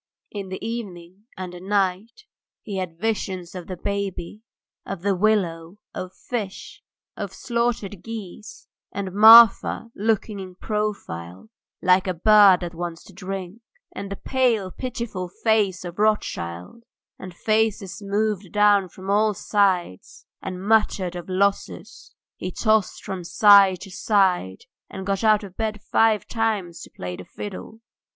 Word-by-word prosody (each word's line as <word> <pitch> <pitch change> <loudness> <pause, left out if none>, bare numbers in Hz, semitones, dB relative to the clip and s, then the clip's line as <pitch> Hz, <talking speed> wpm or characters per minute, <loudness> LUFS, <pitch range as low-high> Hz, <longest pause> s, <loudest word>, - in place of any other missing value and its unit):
In 200 -2 -6
the 190 - -6
evening 195 -3 -7
and 185 -1 -6
the 180 - -9
night 195 - -1 0.4
he 200 -2 -5
had 180 -3 -4
visions 190 -3 -3
of 180 -2 -8
the 185 - -6
baby, 200 0 -4 0.4
of 195 -3 -7
the 200 0 +2
willow, 180 -3 0 0.2
of 185 - -6
fish, 215 -6 -6 0.3
of - - -5
slaughtered 235 -5 -2
geese, 225 - -9 0.3
and 195 -2 -5
Marfa 225 +1 +7
looking 215 -1 -1
in 185 -1 -9
profile 200 - -4 0.3
like 185 +1 +4
a 185 - -1
bird 200 0 +6
that 175 -1 -5
wants 170 -1 -6
to 195 - -16
drink, 190 +2 -7 0.3
and 200 0 -7
the - - -3
pale, 235 -6 0
pitiful 235 -8 -5
face 205 -5 +2
of 175 +2 -8
Rothschild, 210 - -1 0.4
and 185 - -8
faces 215 -2 0
moved 205 -2 -2
down 205 -2 +4
from 185 +3 -12
all 210 +1 +2
sides 185 - -1 0.2
and 185 0 -6
muttered 205 -5 +2
of 175 +1 -7
losses. 200 +2 -2 0.2
He 185 - -4
tossed 215 +1 0
from 190 -2 -5
side 195 -1 +6
to 195 - -10
side, 185 - +1 0.3
and 190 - -7
got 195 +1 -1
out 215 -1 +4
of 190 -2 -10
bed 215 -1 -3
five 220 +1 +2
times 205 -7 -2
to - - -10
play 90 0 -7
the - - -9
fiddle. 210 +2 -9
195 Hz, 145 wpm, -23 LUFS, 180-215 Hz, 0.4 s, Marfa